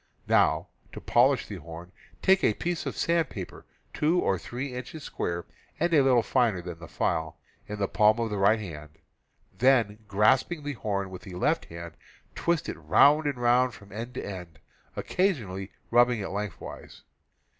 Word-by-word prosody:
Now, -, -, +3 dB, 0.3 s
to -, -, -6 dB
polish -, -, +3 dB
the -, -, -7 dB
horn: 85 Hz, +3 st, -10 dB, 0.3 s
take 190 Hz, 0 st, +4 dB
a 105 Hz, -, +3 dB
piece 175 Hz, -1 st, -3 dB
of -, -, -4 dB
sandpaper 160 Hz, -, -2 dB, 0.3 s
2 160 Hz, +4 st, +2 dB
or 95 Hz, -, +1 dB
3 125 Hz, +6 st, -5 dB
inches 125 Hz, +5 st, -7 dB
square, 85 Hz, 0 st, -3 dB, 0.3 s
and 170 Hz, -, +1 dB
a 150 Hz, -, +6 dB
little 125 Hz, -3 st, +4 dB
finer 115 Hz, -6 st, +2 dB
than 85 Hz, -2 st, -7 dB
the 85 Hz, -, -10 dB
file, 80 Hz, +1 st, -2 dB, 0.3 s
in 105 Hz, -, -5 dB
the 100 Hz, -1 st, 0 dB
palm 105 Hz, +3 st, +3 dB
of 115 Hz, -2 st, -1 dB
the 105 Hz, -, -2 dB
right 105 Hz, +3 st, +4 dB
hand; 75 Hz, -6 st, -9 dB, 0.6 s
then, 115 Hz, -5 st, +3 dB
grasping 130 Hz, -, +2 dB
the 145 Hz, 0 st, -3 dB
horn 100 Hz, -5 st, -3 dB
with 90 Hz, -, -8 dB
the 95 Hz, -4 st, -10 dB
left 90 Hz, -, +1 dB
hand, 85 Hz, 0 st, -9 dB, 0.4 s
twist 170 Hz, -2 st, 0 dB
it -, -, -5 dB
round 145 Hz, -, +5 dB
and 140 Hz, -3 st, -1 dB
round 120 Hz, 0 st, +3 dB
from 100 Hz, 0 st, -15 dB
end 115 Hz, +5 st, -6 dB
to -, -, -4 dB
end, 90 Hz, -6 st, -8 dB, 0.4 s
occasionally 110 Hz, -, -1 dB, 0.2 s
rubbing 120 Hz, 0 st, +4 dB
it 100 Hz, -, -4 dB
lengthwise. 105 Hz, +1 st, -7 dB
110 Hz, 170 wpm, -27 LUFS, 95-130 Hz, 0.6 s, a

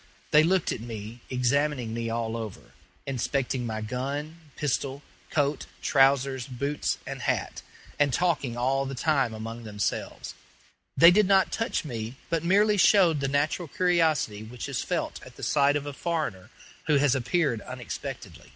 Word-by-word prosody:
They 150 Hz, -, +7 dB
looked 180 Hz, +2 st, +2 dB
at -, -, -4 dB
me, 115 Hz, 0 st, -7 dB
examining 125 Hz, -1 st, 0 dB
me 115 Hz, 0 st, -2 dB
all 115 Hz, 0 st, -2 dB
over, 110 Hz, -4 st, -7 dB, 0.3 s
inspecting 130 Hz, -1 st, -1 dB
my 110 Hz, -1 st, -3 dB
gun, 140 Hz, +8 st, -4 dB, 0.2 s
pistol, 140 Hz, 0 st, -2 dB, 0.3 s
coat, 145 Hz, -1 st, 0 dB, 0.2 s
trousers, 135 Hz, -2 st, +3 dB
boots, 140 Hz, +3 st, -2 dB
and -, -, -6 dB
hat, -, -, -1 dB, 0.4 s
and 145 Hz, -1 st, +3 dB
talking 145 Hz, -6 st, 0 dB
all 135 Hz, +2 st, +1 dB
the 135 Hz, -, -5 dB
time 135 Hz, -3 st, +1 dB
among 115 Hz, +2 st, -6 dB
themselves. 105 Hz, -2 st, -3 dB, 0.6 s
They 170 Hz, +2 st, +9 dB
did 205 Hz, +1 st, +4 dB
not 195 Hz, -1 st, +4 dB
touch 225 Hz, -5 st, -1 dB
me, 115 Hz, -3 st, -5 dB, 0.2 s
but 165 Hz, -1 st, 0 dB
merely 205 Hz, +4 st, +4 dB
showed 180 Hz, -6 st, +5 dB
the 140 Hz, -, 0 dB
natural 145 Hz, +5 st, 0 dB
curiosity 165 Hz, -, +1 dB
which 115 Hz, +2 st, -7 dB
is -, -, -2 dB
felt -, -, -3 dB
at -, -, -13 dB
the -, -, -11 dB
sight 145 Hz, -1 st, +3 dB
of 145 Hz, -1 st, -1 dB
a 145 Hz, -, -5 dB
foreigner 155 Hz, -, -3 dB, 0.4 s
who 150 Hz, -, +4 dB
has 140 Hz, -2 st, +3 dB
appeared 130 Hz, -2 st, 0 dB
unexpectedly. -, -, -7 dB
140 Hz, 155 wpm, -27 LUFS, 120-155 Hz, 0.6 s, They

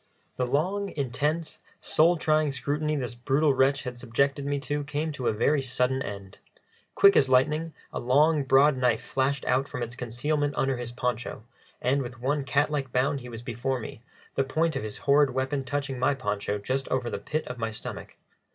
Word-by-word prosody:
The 125 Hz, -, -1 dB
long, 190 Hz, +10 st, 0 dB
intense, 150 Hz, +5 st, -1 dB, 0.2 s
soul 170 Hz, +3 st, +3 dB
trying 155 Hz, -1 st, +2 dB
scrutiny 145 Hz, +3 st, -1 dB
this 125 Hz, -4 st, -3 dB
brutal 135 Hz, +5 st, +2 dB
wretch 135 Hz, +1 st, +2 dB
had 125 Hz, -2 st, -6 dB
subjected 140 Hz, +4 st, 0 dB
me 145 Hz, 0 st, 0 dB
to 145 Hz, +2 st, -2 dB
came 150 Hz, +2 st, -2 dB
to 135 Hz, -4 st, -3 dB
a -, -, +4 dB
very 135 Hz, +7 st, +2 dB
sudden 130 Hz, 0 st, 0 dB
end. 100 Hz, -3 st, -7 dB, 0.6 s
Quick 200 Hz, 0 st, +7 dB
as 135 Hz, -, +4 dB
lightning 150 Hz, +5 st, +2 dB, 0.2 s
a -, -, -2 dB
long, 145 Hz, +5 st, +3 dB
broad 135 Hz, +2 st, +5 dB
knife 125 Hz, -3 st, +1 dB
flashed 135 Hz, +1 st, -1 dB
out 130 Hz, +2 st, +1 dB
from 125 Hz, -, -4 dB
its 120 Hz, +1 st, -6 dB
concealment 145 Hz, +5 st, -1 dB
under 135 Hz, -1 st, +1 dB
his 120 Hz, -1 st, -5 dB
poncho, 120 Hz, -3 st, -3 dB, 0.4 s
and 135 Hz, +3 st, +1 dB
with 125 Hz, -1 st, -7 dB
one 140 Hz, +3 st, 0 dB
cat 140 Hz, +3 st, +1 dB
like 135 Hz, -4 st, -2 dB
bound 135 Hz, +3 st, +1 dB
he 125 Hz, -1 st, -9 dB
was 115 Hz, 0 st, -8 dB
before 125 Hz, +2 st, -2 dB
me, 110 Hz, 0 st, -8 dB, 0.3 s
the 135 Hz, -, +1 dB
point 155 Hz, +3 st, 0 dB
of 135 Hz, -, -1 dB
his 105 Hz, -1 st, -5 dB
horrid 145 Hz, 0 st, +5 dB
weapon 135 Hz, +1 st, -1 dB
touching 135 Hz, 0 st, -3 dB
my 130 Hz, +2 st, +2 dB
poncho 105 Hz, -4 st, -2 dB
just 130 Hz, +6 st, -2 dB
over 125 Hz, -2 st, -1 dB
the -, -, -3 dB
pit 155 Hz, 0 st, -3 dB
of 125 Hz, -1 st, -6 dB
my 115 Hz, 0 st, -1 dB
stomach. 110 Hz, -, -7 dB
135 Hz, 195 wpm, -27 LUFS, 125-145 Hz, 0.6 s, Quick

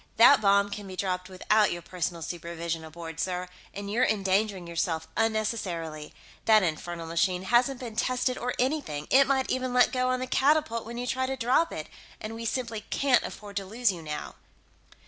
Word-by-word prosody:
That 250 Hz, +5 st, +8 dB
bomb 200 Hz, 0 st, +4 dB
can 205 Hz, 0 st, -6 dB
be 185 Hz, -, -7 dB
dropped 185 Hz, -1 st, -2 dB
without 205 Hz, +3 st, +2 dB
your 175 Hz, 0 st, -5 dB
personal 175 Hz, -2 st, -3 dB
supervision 170 Hz, -1 st, -4 dB
aboard, 165 Hz, 0 st, -8 dB
sir, 180 Hz, +1 st, -2 dB, 0.2 s
and 200 Hz, 0 st, -6 dB
you're 225 Hz, +5 st, +1 dB
endangering 195 Hz, -2 st, +1 dB
yourself 165 Hz, -1 st, -2 dB
unnecessarily. 190 Hz, -9 st, -1 dB, 0.3 s
That 215 Hz, -2 st, +6 dB
infernal 170 Hz, 0 st, -3 dB
machine 180 Hz, +2 st, 0 dB
hasn't 245 Hz, +5 st, +2 dB
been 235 Hz, -4 st, -7 dB
tested 255 Hz, +2 st, 0 dB
or 250 Hz, 0 st, -3 dB
anything; 255 Hz, -, -1 dB
it 275 Hz, +1 st, +6 dB
might 265 Hz, -1 st, +1 dB
even 255 Hz, -1 st, -1 dB
let 250 Hz, -, +5 dB
go 255 Hz, 0 st, +1 dB
on 255 Hz, 0 st, +1 dB
the 255 Hz, -, -2 dB
catapult 265 Hz, -5 st, +2 dB
when 235 Hz, +1 st, -6 dB
you 245 Hz, -, -3 dB
try 260 Hz, +1 st, -1 dB
to 265 Hz, 0 st, -3 dB
drop 260 Hz, +7 st, +2 dB
it. -, -, -5 dB, 0.3 s
And 215 Hz, +1 st, -6 dB
we 230 Hz, +1 st, -6 dB
simply 230 Hz, -2 st, -2 dB
can't 270 Hz, -3 st, +3 dB
afford 205 Hz, -1 st, -7 dB
to 195 Hz, -, -2 dB
lose 230 Hz, +2 st, +1 dB
you, 175 Hz, -3 st, -7 dB
now." 150 Hz, -1 st, -6 dB
210 Hz, 185 wpm, -28 LUFS, 175-245 Hz, 0.3 s, That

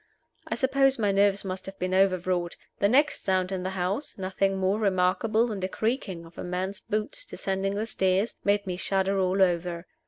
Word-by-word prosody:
I -, -, -1 dB
suppose 270 Hz, 0 st, +3 dB
my 210 Hz, -3 st, +2 dB
nerves 200 Hz, 0 st, +2 dB
must 185 Hz, 0 st, -5 dB
have 195 Hz, 0 st, -8 dB
been 185 Hz, +1 st, -2 dB
overwrought. 185 Hz, -2 st, +1 dB, 0.2 s
The 200 Hz, -, +3 dB
next 285 Hz, +6 st, +3 dB
sound 185 Hz, -1 st, +1 dB
in 190 Hz, -1 st, -2 dB
the 185 Hz, -, -2 dB
house 190 Hz, +10 st, -2 dB
nothing 195 Hz, 0 st, 0 dB
more 190 Hz, +2 st, +1 dB
remarkable 200 Hz, +3 st, +2 dB
than 215 Hz, -4 st, -4 dB
the 185 Hz, 0 st, -2 dB
creaking 210 Hz, -6 st, -2 dB
of 165 Hz, +1 st, -14 dB
a -, -, -4 dB
man's 185 Hz, +2 st, -3 dB
boots 220 Hz, -, -3 dB
descending 195 Hz, -, -2 dB
the 210 Hz, +2 st, -1 dB
stairs 190 Hz, 0 st, 0 dB
made 200 Hz, 0 st, +2 dB
me 180 Hz, -2 st, -3 dB
shudder 195 Hz, +1 st, 0 dB
all 190 Hz, +1 st, +3 dB
over. 175 Hz, -1 st, -1 dB
195 Hz, 190 wpm, -27 LUFS, 185-205 Hz, 0.2 s, suppose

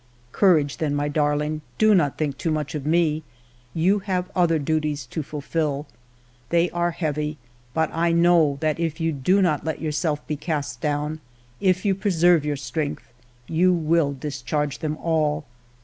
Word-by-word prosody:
" 120 Hz, 0 st, -33 dB
Courage, 155 Hz, -7 st, +3 dB
then, 150 Hz, -2 st, -1 dB
my 145 Hz, 0 st, 0 dB
darling. 150 Hz, +1 st, 0 dB, 0.2 s
Do 215 Hz, 0 st, +5 dB
not 150 Hz, -8 st, +2 dB
think 145 Hz, -3 st, -1 dB
too 165 Hz, -, -1 dB
much 150 Hz, -3 st, -2 dB
of 150 Hz, -2 st, -4 dB
me; 160 Hz, -1 st, +2 dB, 0.5 s
you 185 Hz, +5 st, +3 dB
have 185 Hz, -2 st, -2 dB
other 170 Hz, -3 st, +3 dB
duties 150 Hz, -2 st, -1 dB
to 140 Hz, +6 st, -4 dB
fulfil. 150 Hz, 0 st, -2 dB, 0.6 s
They 170 Hz, +1 st, +2 dB
are 175 Hz, 0 st, 0 dB
heavy, 150 Hz, -2 st, -2 dB, 0.4 s
but 160 Hz, 0 st, +1 dB
I 170 Hz, +1 st, +1 dB
know 170 Hz, -4 st, +4 dB
that 155 Hz, 0 st, 0 dB
if 165 Hz, -1 st, -2 dB
you 165 Hz, 0 st, +1 dB
do 180 Hz, +8 st, +2 dB
not 155 Hz, -5 st, +1 dB
let 160 Hz, -1 st, -3 dB
yourself 155 Hz, -1 st, -1 dB
be 150 Hz, -, -2 dB
cast 145 Hz, -5 st, -3 dB
down, 150 Hz, +1 st, -1 dB, 0.4 s
if 185 Hz, 0 st, +1 dB
you 200 Hz, -, +3 dB
preserve 175 Hz, -4 st, +3 dB
your 150 Hz, -1 st, -1 dB
strength, 145 Hz, +2 st, -4 dB, 0.3 s
you 180 Hz, +3 st, +3 dB
will 160 Hz, -3 st, +2 dB
discharge 140 Hz, +1 st, -3 dB
them 155 Hz, -2 st, -2 dB
all. 155 Hz, -3 st, 0 dB
155 Hz, 165 wpm, -24 LUFS, 145-170 Hz, 0.6 s, Do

